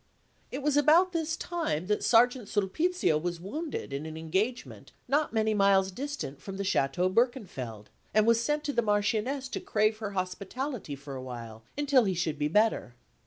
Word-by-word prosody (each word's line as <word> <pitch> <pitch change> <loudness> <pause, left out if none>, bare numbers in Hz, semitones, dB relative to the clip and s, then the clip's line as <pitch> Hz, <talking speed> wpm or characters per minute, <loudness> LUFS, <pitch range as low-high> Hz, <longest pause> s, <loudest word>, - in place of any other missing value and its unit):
It 270 +2 -5
was 290 -1 +2
about 325 +6 +5
this 325 -1 -1
time 320 - -2
that 210 +2 0
Sergeant 245 -1 +4
Sulpizio 210 - +1
was 175 +1 -3
wounded 275 - -5
in 145 +3 -4
an 160 0 -7
engagement 195 +10 -3
not 290 +4 +1
many 220 -1 +1
miles 195 -2 +4
distant 255 - -5
from 195 +5 -7
the 200 - -2
Château 180 +1 +1
Berkenfeld, 185 - -1 0.2
and 215 0 +4
was 230 0 +4
sent 295 +4 0
to 290 - -2
the 235 - +2
Marchioness 215 +5 0
to - - -3
crave 215 0 +1
her 205 -3 -4
hospitality 195 - -4
for 140 0 -9
awhile 120 -4 -7 0.2
until 280 -4 +4
he 190 -2 0
should 160 -3 -2
be 150 - +1
better. 210 - +1
210 Hz, 170 wpm, -29 LUFS, 170-265 Hz, 0.2 s, about